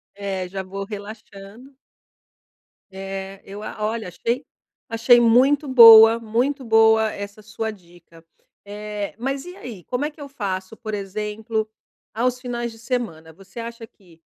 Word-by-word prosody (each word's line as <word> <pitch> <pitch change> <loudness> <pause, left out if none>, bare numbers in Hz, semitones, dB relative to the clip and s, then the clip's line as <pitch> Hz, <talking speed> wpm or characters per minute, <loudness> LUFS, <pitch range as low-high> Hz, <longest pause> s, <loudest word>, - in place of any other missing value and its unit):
É, 195 -2 -4
já 190 +1 -5
vou 195 +1 -6
relaxando. 210 +4 -11 1.2
Eh, 195 0 -7
eu 200 +2 -9
a - - -7
olha 220 -1 -3
achei 235 +8 -3 0.4
achei 235 +1 +5
muito 260 +5 +4
boa, 230 -3 +9
muito 245 +5 -1
boa 220 -1 +4
essa 200 +1 -8
sua 220 +1 -5
dica. 175 -4 -18 0.4
Eh, 210 0 -6
mas 270 +5 -3
e 360 +1 -10
aí, 220 - -10
como 255 +3 -2
é 300 - -3
que 300 - -16
eu 280 - -8
faço? 200 -5 -5
Por 215 -1 -7
exemplo, 210 +2 -3 0.5
aos 250 +2 0
finais 240 -2 -4
de 225 - -14
semana, 225 -10 -4
você 195 +6 -13
acha 230 0 -7
que 175 -6 -23
220 Hz, 145 wpm, -22 LUFS, 195-240 Hz, 1.2 s, boa